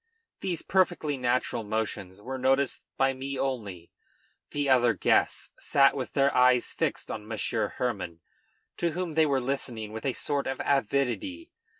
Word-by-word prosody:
These 175 -4 -2
perfectly 175 -6 +1
natural 125 -2 0
motions 105 -3 -3
were 130 +2 -4
noticed 135 +1 +2 0.2
by 135 0 +3
me 135 +1 -5
only; 105 -11 -3 0.6
the 145 -1 -1
other 120 -4 +4
guests - - +2
sat 140 -1 +4
with 130 -3 -4
their 140 0 +3
eyes 125 -1 +4
fixed - - -2
on 105 -1 -6
Monsieur 110 -1 -1
Hermann, 85 0 -2 0.6
to 170 -2 0
whom 175 -1 -3
they 160 0 +4
were 140 -2 +2
listening 125 -4 -3
with 110 +4 -4
a 130 - +1
sort 140 +1 -1
of 135 0 -3
avidity. 140 - 0
130 Hz, 155 wpm, -28 LUFS, 115-140 Hz, 0.6 s, other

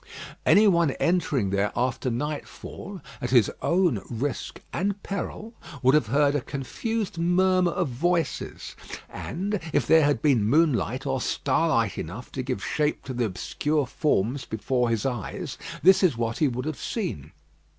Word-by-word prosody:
Any 210 +1 +7
one 170 -5 +4
entering 150 - +1
there 100 +1 +1
after 125 +1 0
nightfall, 150 - -5 0.2
at 125 - -2
his 120 -5 +4
own 170 - +2
risk 130 +4 -3
and 200 +2 -1
peril, 210 +3 -5 0.3
would 130 +1 +5
have 150 -7 +3
heard 140 +4 +3
a 145 - 0
confused 175 - -3
murmur 180 +1 +3
of 175 -3 -1
voices; 165 +7 -2 0.4
and, 200 +4 -3
if - - +2
there 160 -1 +6
had 145 0 +1
been 135 -8 +4
moonlight 130 - +2
or 135 -2 -1
starlight 115 -11 +1
enough 100 +10 -7
to 130 - -3
give 125 -6 -3
shape 150 0 0
to 130 - -5
the 120 -1 0
obscure 145 +9 -1
forms 130 -2 0
before 120 +3 -1
his 115 0 0
eyes, 120 -6 -4 0.2
this 190 +2 +7
is 170 -11 +3
what 115 0 -2
he 150 - +4
would 125 0 -3
have 155 -2 -4
seen. 80 - -4
140 Hz, 155 wpm, -26 LUFS, 120-170 Hz, 0.4 s, Any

